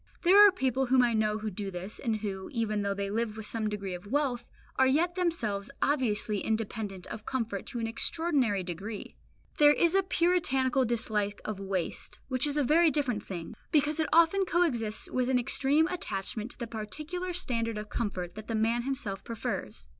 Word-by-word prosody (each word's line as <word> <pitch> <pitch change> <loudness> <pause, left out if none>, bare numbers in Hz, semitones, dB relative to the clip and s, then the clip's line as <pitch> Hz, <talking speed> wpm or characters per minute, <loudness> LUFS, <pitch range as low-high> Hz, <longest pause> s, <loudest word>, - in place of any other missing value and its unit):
There 375 +3 +7
are - - +5
people 265 -6 0
whom 255 0 +5
I 240 -1 +2
know 215 -1 +1
who 215 0 -4
do 200 +1 -4
this, 185 +3 -6
and 230 -4 0
who, 200 -3 -4
even 220 -4 -1
though 200 0 -1
they 200 0 -3
live 220 0 -2
with 220 - -5
some 215 -1 -1
degree 200 -3 -4
of 180 +3 -8
wealth, 255 -1 -1 0.3
are 265 - +5
yet 325 +6 +2
themselves 240 - -1
obviously 220 -7 +1
independent 215 -4 -3
of 220 -1 -8
comfort 230 -6 -3
to 250 - -5
an 230 - -1
extraordinary 250 - +1
degree. 195 +5 -6 0.4
There 295 0 +8
is 340 +3 +2
a 390 - +5
Puritanical 270 -8 +2
dislike 215 -3 0
of 215 -2 -4
waste 195 -3 -4
which 255 +2 +2
is 290 0 0
a 295 - +3
very 320 +5 +5
different 260 -7 0
thing, 170 -4 -6 0.2
because 300 +1 +2
it 315 - +1
often 335 +4 +5
coexists 280 - 0
with 255 0 -1
an 260 - +3
extreme 280 +5 +2
attachment 215 - -3
to - - -8
the 235 - -4
particular 305 +12 -5
standard 230 -10 -2
of 210 0 -6
comfort 185 -6 -3
that 215 0 -9
the 225 - -2
man 225 +2 +1
himself 235 -7 -4
prefers. 230 -2 -5
230 Hz, 190 wpm, -29 LUFS, 210-290 Hz, 0.4 s, There